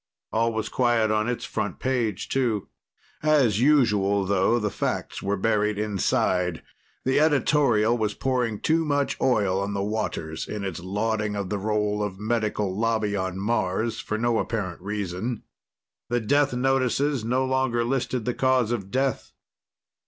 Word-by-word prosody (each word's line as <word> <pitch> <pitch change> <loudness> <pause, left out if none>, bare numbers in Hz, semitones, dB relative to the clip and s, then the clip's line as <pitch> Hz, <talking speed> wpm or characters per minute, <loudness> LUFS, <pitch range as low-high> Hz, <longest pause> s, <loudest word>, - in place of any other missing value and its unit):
All 115 +1 +2
was 110 -1 -2
quiet 120 -2 +2
on 110 +2 +1
its 125 - -3
front - - -3
page, 120 -7 -1
too. 120 -6 0 0.5
As 140 -9 +3
usual, 105 -9 +3
though, 100 +4 +2
the 105 -3 -1
facts - - -3
were 100 +1 -1
buried 105 +1 +1
inside. 95 -4 0 0.4
The 130 +2 +3
editorial 140 -7 +3
was 110 -3 -1
pouring 125 -5 -1
too 165 +1 +2
much 145 -2 0
oil 100 -7 +2
on 100 +1 -2
the 100 - -1
waters 100 -7 -3
in 105 -1 -4
its 95 -4 -4
lauding 105 +3 -1
of 100 -2 -4
the 105 - -1
role 105 0 0
of 100 -2 -3
Medical 105 -3 -1
Lobby 110 -1 0
on 95 -1 -2
Mars 105 +1 -1
for 110 - -3
no 120 0 +1
apparent 95 -7 -3
reason. 105 +3 -3 0.7
The 120 0 +1
death 145 +5 +2
notices 135 +1 +1
no 125 +3 +1
longer 130 -2 +1
listed 125 -1 -1
the 125 - 0
cause 130 -3 +2
of 100 -5 -3
death. 130 +3 -1
110 Hz, 150 wpm, -25 LUFS, 100-125 Hz, 0.7 s, As